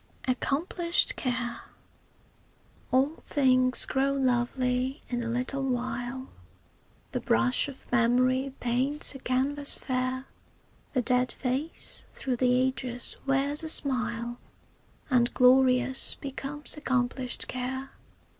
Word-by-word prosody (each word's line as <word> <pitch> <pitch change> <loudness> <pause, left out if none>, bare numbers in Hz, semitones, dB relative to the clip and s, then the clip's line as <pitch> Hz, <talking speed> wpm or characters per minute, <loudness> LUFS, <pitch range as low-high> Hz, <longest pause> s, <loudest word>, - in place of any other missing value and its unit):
ACCOMPLISHED 335 +7 +1
CARE 245 -2 -3 1.3
All 275 +5 +2
things 255 -2 +5
grow 275 +1 0
lovely 255 +1 -1
in 240 -1 -2
a 230 - -4
little 250 +3 -2
while, 255 0 -3 0.8
The - - -3
brush 120 - +2
of 275 -2 -11
memory 255 +3 +2
paints 260 +6 +1
a 270 - -9
canvas 275 +3 0
fair; 255 0 -3 0.7
The 255 - +1
dead 250 +1 +2
face 275 +5 -3
through 255 -2 -3
the 250 0 +2
ages 255 -2 -3
wears 275 +2 +2
a 320 - -4
smile, 240 -4 0 0.7
And 240 -2 +3
glorious 255 0 +4
becomes 280 +1 -1
accomplished 255 -3 -2
care. 260 +2 -5
255 Hz, 105 wpm, -27 LUFS, 250-270 Hz, 1.3 s, things